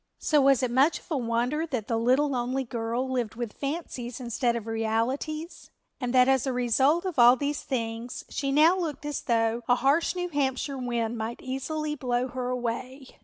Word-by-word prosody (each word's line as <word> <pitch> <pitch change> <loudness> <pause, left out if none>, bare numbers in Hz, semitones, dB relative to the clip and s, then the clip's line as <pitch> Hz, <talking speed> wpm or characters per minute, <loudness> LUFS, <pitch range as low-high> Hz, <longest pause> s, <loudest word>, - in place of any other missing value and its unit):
So 300 -2 +2
was 270 -1 +4
it 250 - 0
much 270 +6 +4
of - - -18
a 305 - +1
wonder 245 +7 0
that 250 -8 -3
the 230 - 0
little 255 +6 +3
lonely 255 +1 -1
girl 235 +1 -2
lived 245 -4 -2
with 235 -2 -4
fancies 275 -5 -5
instead 240 0 0
of 230 -2 -4
realities 230 +9 -2 0.3
and 250 -3 -2
that 250 0 +5
as 265 0 +2
a - - +1
result 265 - +2
of 360 -8 -2
all 240 +1 +8
these 290 +3 -2
things 230 -1 -4
she 275 -1 -2
now 310 +5 +5
looked 320 -6 -4
as 295 -1 -3
though 230 0 +1
a 245 - +5
harsh 280 +8 +2
New 355 0 -2
Hampshire 275 -2 -1
wind 235 -2 -2
might 225 +2 -4
easily 300 +4 -3
blow 250 -3 -1
her 250 0 -3
away? 250 +2 -4
255 Hz, 190 wpm, -27 LUFS, 235-285 Hz, 0.3 s, all